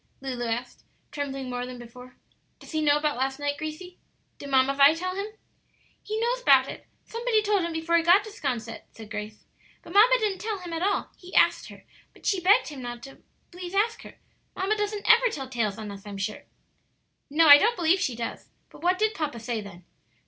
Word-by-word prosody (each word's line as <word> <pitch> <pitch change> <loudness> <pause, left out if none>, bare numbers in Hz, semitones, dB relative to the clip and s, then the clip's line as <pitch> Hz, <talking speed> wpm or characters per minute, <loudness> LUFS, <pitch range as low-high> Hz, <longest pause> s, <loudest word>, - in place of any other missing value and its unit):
Lulu 255 -3 -4
asked, 240 +2 -4 0.3
trembling 275 -2 -4
more 245 0 -3
than 250 0 -8
before. 250 +1 -13 0.4
"Does - - -14
he 315 -1 -1
know 295 -1 +4
about 295 -3 -1
last 265 +1 -1
night, 290 0 -2
Gracie? 310 +4 -7 0.4
Did 285 - -8
Mamma 265 0 +3
Vi 280 +3 +6
tell 370 +2 -3
him?" 400 +2 -3 0.7
"He 430 +1 -4
knows 485 +2 0
'bout - - +5
it; - - -9 0.2
somebody 460 -2 0
told 410 -2 +2
him 340 0 -2
before 325 +1 +1
he - - +3
got 350 +5 +5
to 430 - -10
'Sconset," 240 - -4
said 220 -2 -13
Grace. 210 0 -7 0.4
"But 335 - -11
mamma 450 +5 +7
didn't 420 -5 -1
tell 435 -1 -3
him 355 -2 -8
at 330 - -3
all; 400 +2 0
he 360 0 -12
asked - - +3
her, - - -14 0.3
but - - -19
she 390 - +1
begged 400 +5 +4
him 285 -4 -8 0.2
to 270 +3 -12 0.3
please 355 +1 -8
not 405 +2 +4
ask 455 0 -11
her. - - -13 0.4
Mamma 390 +3 0
doesn't 415 -1 -3
ever 475 +2 +6
tell 270 -10 -6
tales 230 -6 -2
on 215 -2 -7
us, 200 -1 -10
I'm 200 -1 -7
sure." 210 +2 -4 0.8
"No, 320 +3 +4
I 290 -1 +10
don't 455 +6 +2
believe 350 +1 +2
she 265 -11 -1
does. 230 0 -6 0.2
But - - -15
what 360 +2 +2
did 435 +2 +1
papa 295 -6 -4
say 230 -1 -3
then?" 185 -4 -12
310 Hz, 215 wpm, -26 LUFS, 250-395 Hz, 0.8 s, I